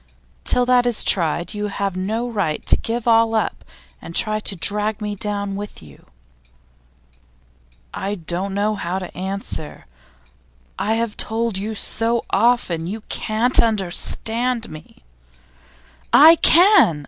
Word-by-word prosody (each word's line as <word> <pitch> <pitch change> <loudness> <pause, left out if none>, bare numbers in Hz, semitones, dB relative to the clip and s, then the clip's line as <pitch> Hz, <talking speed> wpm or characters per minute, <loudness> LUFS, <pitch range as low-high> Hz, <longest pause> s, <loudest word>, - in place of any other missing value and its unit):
Till 250 - +2
that 245 -1 +3
is 240 -3 0
tried, 170 -1 +1
you 210 0 -3
have 200 -2 -3
no 220 +6 -2
right 200 -10 -2
to - - +4
give 235 +1 -4
all 225 -1 +4
up 220 - -2 0.4
and 170 - -10
try 215 -1 +1
to 205 - -3
drag 210 +4 -1
me 210 -1 -4
down 200 -1 -4
with 205 - -8
you.' 70 -3 -17 1.9
'I 200 +1 -3
don't 185 +2 -4
know 210 +2 0
how 185 -3 -3
to 185 -2 -7
answer. 190 -4 -6 0.9
I 220 +2 0
have 230 -2 -3
told 225 -1 -1
you 215 +2 -4
so 230 +2 -1
often 195 -7 +1
You 215 +4 -5
can't 225 +4 +1
understand 225 +3 0
me!' 155 - -13 1.1
'I 320 +3 +8
can! 345 - +5
210 Hz, 135 wpm, -20 LUFS, 190-230 Hz, 1.9 s, I